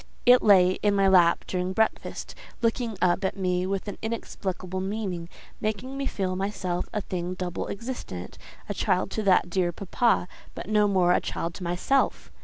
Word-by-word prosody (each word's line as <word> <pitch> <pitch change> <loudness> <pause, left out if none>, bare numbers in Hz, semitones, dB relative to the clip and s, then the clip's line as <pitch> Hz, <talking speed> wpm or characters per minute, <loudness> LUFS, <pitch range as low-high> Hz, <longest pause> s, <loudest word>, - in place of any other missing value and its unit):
It 245 +1 +7
lay 185 -3 +5
in 205 -1 +2
my 195 -1 +4
lap 175 -3 +5
during 180 0 -2
breakfast, 220 +2 -1 0.3
looking 230 -2 0
up 180 +1 +2
at 190 - -1
me 180 -1 0
with 195 +1 -2
an 205 - -6
inexplicable 190 -4 -4
meaning, 190 -4 -3 0.3
making 215 +5 -3
me 275 0 -2
feel 185 -2 -2
myself 185 -2 -2
a 210 - -2
thing 180 -1 -4
double 180 -1 -4
existent—a 205 - -7
child 190 -1 0
to 220 - -2
that 185 -3 +3
dear 180 -1 +1
papa, 195 +3 +1 0.3
but - - -7
no 210 0 +3
more 185 -3 +3
a - - +2
child 170 0 -3
to 185 - -8
myself. 180 +11 0
190 Hz, 170 wpm, -26 LUFS, 180-210 Hz, 0.3 s, It